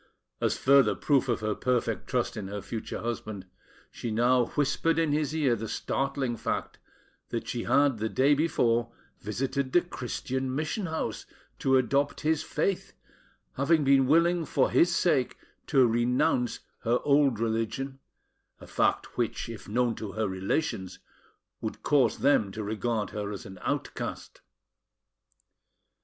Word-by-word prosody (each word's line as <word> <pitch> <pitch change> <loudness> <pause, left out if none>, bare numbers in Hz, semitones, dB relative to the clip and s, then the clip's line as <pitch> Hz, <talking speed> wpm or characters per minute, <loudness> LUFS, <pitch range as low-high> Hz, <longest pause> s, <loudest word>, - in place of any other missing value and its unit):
As - - +1
a - - -9
further 135 -5 +5
proof 135 -3 +1
of 120 - 0
her 110 0 0
perfect 125 +1 -1
trust - - -1
in 100 - -5
her 100 0 -5
future 115 -2 -5
husband, 110 -4 -4 0.5
she 120 - -5
now 120 +3 +3
whispered 150 +3 0
in 165 -2 +2
his 150 0 0
ear 140 -7 +2
the 110 0 -5
startling 135 -2 -1
fact - - -3 0.5
that - - -4
she - - -3
had 140 -5 +3
the 110 +1 -1
day 135 +5 +3
before 120 -6 +1 0.3
visited 130 +5 -2
the 175 - +6
Christian 130 -4 -4
mission 155 +7 -2
house, 160 0 -4 0.3
to 135 0 +3
adopt 140 +3 +1
his 155 0 +1
faith, 195 -2 -2 0.6
having 150 +3 +3
been 135 -1 +4
willing 170 +3 +3
for - - +1
his 175 - +5
sake 150 -9 +1 0.3
to 135 -4 +5
renounce 120 +1 +1 0.2
her 120 +1 +1
old 140 -5 +3
religion, 115 +4 -2 0.6
a - - -11
fact - - 0
which, 115 -1 -1
if 115 -3 -9
known 120 +2 +1
to 110 -2 -7
her 110 -1 -1
relations, 95 - -2 0.6
would - - -5
cause 145 -3 +3
them 110 -8 +3
to 110 - -4
regard 110 0 -2
her 105 -1 -4
as 100 +2 -7
an 95 -2 -10
outcast. - - -4
130 Hz, 145 wpm, -28 LUFS, 110-145 Hz, 0.6 s, the